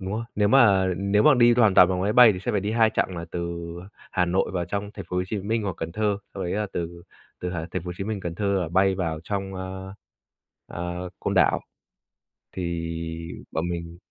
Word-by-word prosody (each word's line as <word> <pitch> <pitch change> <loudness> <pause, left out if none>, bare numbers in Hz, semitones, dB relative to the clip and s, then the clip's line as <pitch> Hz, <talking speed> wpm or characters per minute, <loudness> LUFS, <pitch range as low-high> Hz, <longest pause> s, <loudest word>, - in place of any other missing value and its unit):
đúng 95 0 -4
rồi, 115 +2 -2
nếu 105 0 +3
mà 105 -7 +5
nếu 100 +2 +2
mà 150 +2 +7
đi 120 -1 +5
hoàn 110 -5 +4
toàn 90 - +8
bằng 90 -1 -1
máy 105 - +1
bay 120 -2 +8
thì 90 - -5
sẽ - - -2
phải 100 - +1
đi 105 +2 -2
2 110 -1 +4
chặng 95 -4 -1
là 85 - -4
từ 85 -1 -3 0.5
Hà 90 - +2
Nội 90 +2 0
vào 90 -2 -1
trong 100 +4 -4
thành 100 - -7
phố 90 - -3
Hồ 90 - +2
Chí 105 - -2
Minh 110 +3 -1
hoặc 95 -4 -3
Cần 80 0 -4
Thơ, 105 -1 0 0.2
xong 95 - -4
đấy 90 - -2
là 105 +1 -1
từ 85 0 -5 0.4
từ 90 - -3
h - - -5
thành 85 +1 -4
phố - - -12
Hồ 90 - -3
Chí 95 - -3
Minh, 105 -1 -3
Cần 85 -2 -4
Thơ 100 +2 -2 0.2
là 85 - -3
bay 95 +3 +3
vào 80 -4 -2
trong, 95 -1 -3
a, 95 +1 -6 0.7
ờ, 90 +1 -5
Côn - - -1
Đảo. - - +4 0.9
Thì 85 -2 -3 0.6
bọn 80 +2 -2
mình 85 0 -5
95 Hz, 240 wpm, -25 LUFS, 85-105 Hz, 0.9 s, toàn